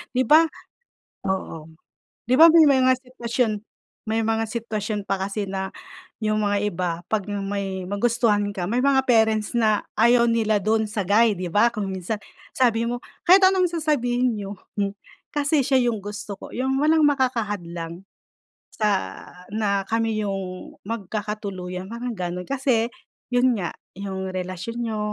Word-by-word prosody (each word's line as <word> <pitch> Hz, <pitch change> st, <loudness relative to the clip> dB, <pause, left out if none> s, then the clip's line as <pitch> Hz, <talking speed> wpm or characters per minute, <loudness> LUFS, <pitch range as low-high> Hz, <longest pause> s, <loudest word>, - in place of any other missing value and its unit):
Di 255 Hz, -, +3 dB
ba? 315 Hz, +6 st, +6 dB, 0.9 s
Oo.'Di 160 Hz, -4 st, -7 dB, 0.5 s
ba 330 Hz, -, +11 dB
may 330 Hz, 0 st, +7 dB
mga 260 Hz, -3 st, +5 dB
sitwasyon 235 Hz, -3 st, -1 dB, 0.5 s
may 225 Hz, +1 st, 0 dB
mga 225 Hz, 0 st, 0 dB
sitwasyon 215 Hz, -3 st, -3 dB
pa 195 Hz, -1 st, -1 dB
kasi 200 Hz, +1 st, -2 dB
na 190 Hz, 0 st, -3 dB, 0.5 s
yung 215 Hz, 0 st, +1 dB
mga 205 Hz, -1 st, +1 dB
iba 180 Hz, -3 st, -1 dB, 0.2 s
pag 220 Hz, -2 st, 0 dB
may 195 Hz, -2 st, -3 dB
magustuhan 205 Hz, 0 st, +1 dB
ka, 180 Hz, -, -2 dB
may 245 Hz, -, +1 dB
mga 270 Hz, -1 st, +3 dB
parents 220 Hz, -3 st, +3 dB
na 215 Hz, -3 st, +2 dB, 0.2 s
ayaw 235 Hz, +1 st, +5 dB
nila 220 Hz, -2 st, +2 dB
dun 220 Hz, +1 st, +2 dB
sa 205 Hz, -2 st, -2 dB
guy 215 Hz, +2 st, +4 dB
'di 180 Hz, -2 st, -4 dB
ba? 210 Hz, +3 st, +5 dB
Kung 210 Hz, -2 st, -2 dB
minsan 190 Hz, +3 st, -3 dB, 0.4 s
sabi 235 Hz, -2 st, +2 dB
mo, 245 Hz, -, -2 dB, 0.3 s
kahit 375 Hz, +2 st, +7 dB
anong 375 Hz, -1 st, +4 dB
sasabihin 255 Hz, -7 st, +1 dB
niyo, 200 Hz, -1 st, -5 dB, 0.8 s
kasi 290 Hz, +1 st, +2 dB
siya 265 Hz, +1 st, +2 dB
yung 220 Hz, -, -4 dB
gusto 205 Hz, +1 st, -6 dB
ko. -, -, -9 dB
Yung 265 Hz, +1 st, 0 dB
walang 310 Hz, +1 st, +4 dB
makaka 260 Hz, -5 st, +2 dB
hadlang 170 Hz, -3 st, -6 dB, 0.7 s
sa 210 Hz, -3 st, -1 dB, 0.3 s
na 200 Hz, -2 st, 0 dB
kami 225 Hz, -1 st, 0 dB
yung 190 Hz, -2 st, -5 dB
magkakatuluyan, 200 Hz, -4 st, -5 dB
parang 240 Hz, +1 st, -4 dB
ganun. 180 Hz, -1 st, -4 dB
Kasi 255 Hz, -4 st, +1 dB, 0.5 s
yun 245 Hz, -2 st, +3 dB
nga, 175 Hz, -, -3 dB, 0.3 s
yung 190 Hz, -1 st, -4 dB
relasyon 185 Hz, +5 st, -5 dB
niyo, 220 Hz, -2 st, -2 dB
215 Hz, 145 wpm, -23 LUFS, 195-245 Hz, 0.9 s, ba